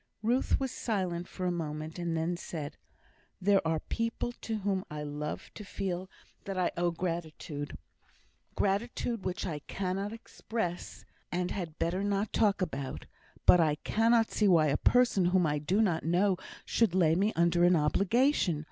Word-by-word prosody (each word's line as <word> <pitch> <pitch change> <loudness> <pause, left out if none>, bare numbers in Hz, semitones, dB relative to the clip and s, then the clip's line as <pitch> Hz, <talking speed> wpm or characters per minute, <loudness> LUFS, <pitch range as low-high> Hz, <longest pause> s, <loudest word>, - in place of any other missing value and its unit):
'" - - -50
Ruth 245 +4 +2
was 265 -2 -2
silent 180 -8 -2
for 185 - -5
a 180 - +2
moment, 155 -1 -4
and 170 -1 -1
then 165 +2 0
said: 155 -3 -6 0.6
"There 195 0 +4
are 160 -1 0
people 230 +1 -2
to 225 - -3
whom 190 -1 0
I 150 0 -5
love 150 +1 -5
to 210 - -8
feel 190 -2 -4 0.4
that 195 -1 -4
I 180 -1 +1
owe 175 0 +1
gratitude 165 -4 -4 0.8
gratitude 215 +2 -1
which 185 +1 -3
I 160 -5 -3
cannot 195 +5 -3
express, 220 -5 -5 0.3
and 180 0 -1
had 170 -5 -4
better 180 +4 0
not 205 +1 0
talk 205 -3 +3
about 140 -6 -4 0.4
but 180 - +8
I 155 -3 +3
cannot 225 +6 +2
see 210 - +2
why 165 -5 +5
a 140 - +2
person 245 -7 +3
whom 180 0 +3
I 150 -1 +1
do 185 +9 +2
not 175 -6 +1
know 185 +4 +3 0.3
should 220 -6 +2
lay 165 -4 +4
me 200 +5 +2
under 170 +1 +3
an 175 0 +6
obligation. 195 - +2
180 Hz, 165 wpm, -31 LUFS, 165-205 Hz, 0.8 s, but